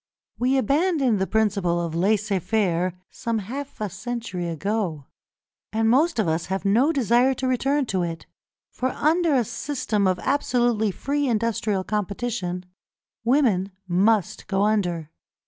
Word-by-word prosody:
We 255 +2 +2
abandoned 275 - +2
the 190 - 0
principle 200 -6 +1
of 170 -2 -3
laissez 200 +3 +1
faire 185 -2 0
some 230 -2 -2
half 260 +8 -6
a 210 - -1
century 195 -1 -4
ago, 170 -3 -2 0.7
and 220 +1 +1
most 315 +5 +3
of 220 - +1
us 160 +1 -1
have 190 +2 -3
no 235 +10 +4
desire 255 -1 +3
to 260 - -2
return 270 +3 +1
to 190 -6 -1
it, 165 -1 -4 0.5
for 255 - -1
under 320 +2 +2
a 250 - +3
system 235 -4 -1
of 185 -1 +2
absolutely 240 -4 +1
free 285 +8 -1
industrial 215 -4 0
competition, 200 -3 -3 0.6
women 230 -7 +2
must 210 +3 +1
go 195 0 +1
under. 175 -7 0
215 Hz, 140 wpm, -24 LUFS, 185-255 Hz, 0.7 s, no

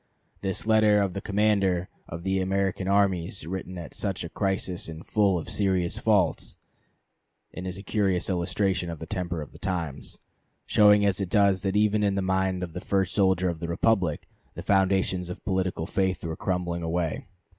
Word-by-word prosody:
This 95 0 -1
letter 110 -1 +4
of 100 -3 0
the 100 - -4
commander 100 -4 +1 0.2
of 85 +1 -7
the 95 0 0
American 95 0 -1
armies 95 -3 +1
written 95 +1 -5
at 85 - -8
such 95 -4 -2
a 85 - -6
crisis 95 -2 -1
is 80 0 -8
full 100 -4 +2
of 80 - -5
serious 95 -4 0
faults, 100 -7 +1 1.0
and 90 0 -6
is 90 0 -5
a 100 - -9
curious 100 -5 0
illustration 90 0 0
of 85 - -5
the 80 - -7
temper 85 -2 -3
of 75 - -13
the - - -15
times, 85 -7 -4 0.5
showing 105 -1 +5
as 100 -1 +1
it 95 - -2
does 100 -1 +3
that 95 0 -1
even 105 0 +3
in 100 -1 +1
the 100 - 0
mind 95 -1 0
of 85 -3 -6
the 90 - -5
first 95 -2 0
soldier 95 -2 +2
of 85 -2 -2
the 85 - -4
republic 85 -2 +1 0.3
the - - -6
foundations 95 -2 +1
of 90 - -8
political 95 -4 -1
faith 95 -2 -1
were 80 -1 -3
crumbling 90 -1 -2
away. 85 -1 -2
95 Hz, 185 wpm, -26 LUFS, 90-100 Hz, 1.0 s, showing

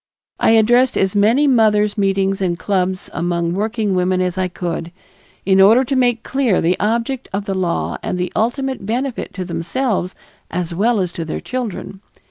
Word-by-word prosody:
I - - +4
addressed 240 +4 +3
as 195 +1 +1
many 225 +8 +4
mothers' 215 -5 +3
meetings 195 -1 0
and 175 -2 0
clubs 185 -1 -1
among 170 0 -1
working 215 +1 -1
women 185 0 +1
as 180 -1 -1
I 185 -1 0
could, 170 -1 -4 0.5
in 190 0 +4
order 225 +7 +6
to 270 +1 -2
make 245 -3 +2
clear 260 -8 +1
the 175 +2 +2
object 235 +5 -1
of 200 +1 -3
the 195 - -2
law 180 -3 -1
and 180 - -3
the 180 0 -3
ultimate 260 +2 -1
benefit 245 +5 -3
to 185 -2 -4
themselves 180 +4 -2 0.3
as 175 -1 -3
well 215 +5 +1
as 180 -2 -2
to 170 - -5
their 160 - -4
children. 225 -6 -5
195 Hz, 175 wpm, -18 LUFS, 180-235 Hz, 0.5 s, order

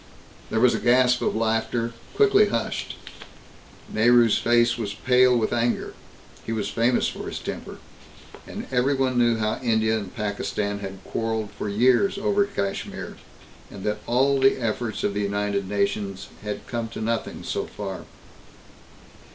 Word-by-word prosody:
There 110 - 0
was 125 +1 +5
a - - -1
gasp 125 0 +4
of - - 0
laughter, 115 +1 0 0.2
quickly 415 0 +5
hushed. - - -2 0.9
Nehru's 115 0 +4
face 120 0 +3
was 105 -3 -4
pale 125 +1 +4
with 110 - 0
anger; 120 0 0 0.5
he - - -5
was 105 -3 -2
famous 115 +4 +2
for - - -6
his - - -4
temper. - - -6 0.7
And - - -6
everyone 130 0 +1
knew 120 -1 +3
how 110 -1 -1
India 110 -2 +2
and 100 -3 -7
Pakistan 100 -1 -2
had 95 -1 -7
quarreled 110 -2 -2
for 105 0 -5
years 125 - +3
over 205 0 +2
Kashmir, 100 - -4 0.5
and 100 -2 -10
that 105 0 -1
all 135 +3 +3
the 135 0 +4
efforts 110 -2 -2
of 100 - 0
the 105 - -1
United 100 -1 -1
Nations 100 -1 -2
had 105 0 -5
come 115 -1 -3
to 115 - -8
nothing 115 +1 -2
so - - -3
far. 95 -2 -6
115 Hz, 150 wpm, -24 LUFS, 105-125 Hz, 0.9 s, was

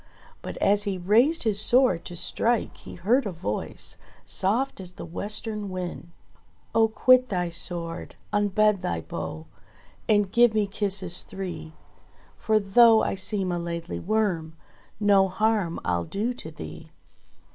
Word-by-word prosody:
But - - -7
as 205 +1 +3
he 195 -2 -2
raised 230 - +3
his 210 -3 +3
sword 245 -8 +3
to 175 - -7
strike 230 +6 0
he - - -11
heard 225 +8 +1
a - - -3
voice, 135 - -4 0.3
soft 230 +8 -1
as 180 -1 -7
the - - -8
western 210 +4 -3
wind: 180 -2 -6 0.6
"Oh 225 0 +4
quit 255 +3 +4
thy 180 -3 -1
sword, 170 0 -2 0.2
unbend 205 -1 +2
thy 85 -1 -2
bow, 80 0 -6 0.6
And 205 -3 +3
give 235 0 +4
me 215 -1 +2
kisses 195 -3 -1
three, 180 -4 -7 0.6
For 215 -1 +1
though 220 +3 +5
I - - 0
seem 190 -1 0
a 175 - -1
Laidly 170 0 -5
Worm 180 -6 -1 0.4
No 200 -2 +4
harm 205 -2 0
I'll 85 -1 0
do 220 - -2
to 200 -10 -6
thee 80 - -10
195 Hz, 145 wpm, -25 LUFS, 175-220 Hz, 0.6 s, though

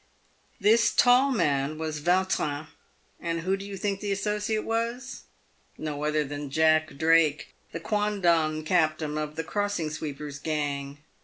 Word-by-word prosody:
This 220 +3 +4
tall 250 +2 +5
man 150 - 0
was 155 -1 -4
Yautrin. 175 -4 +1 0.5
Who 170 +3 -1
do 195 - -7
you 200 -1 -7
think 200 0 -2
the 205 -1 -3
associate 210 +2 -1
was? 235 +3 -3 0.5
No 150 -1 -4
other 150 0 +1
than 145 0 -6
Jack 155 0 +2
Drake, 160 -1 +3 0.2
the 165 - -5
quondam 170 -6 +1
captain 155 -3 +1
of 150 0 -4
the 160 - -3
Crossing 205 -4 -2
Sweepers' 150 -2 -6
gang. 145 -2 -3
160 Hz, 135 wpm, -27 LUFS, 150-205 Hz, 0.5 s, tall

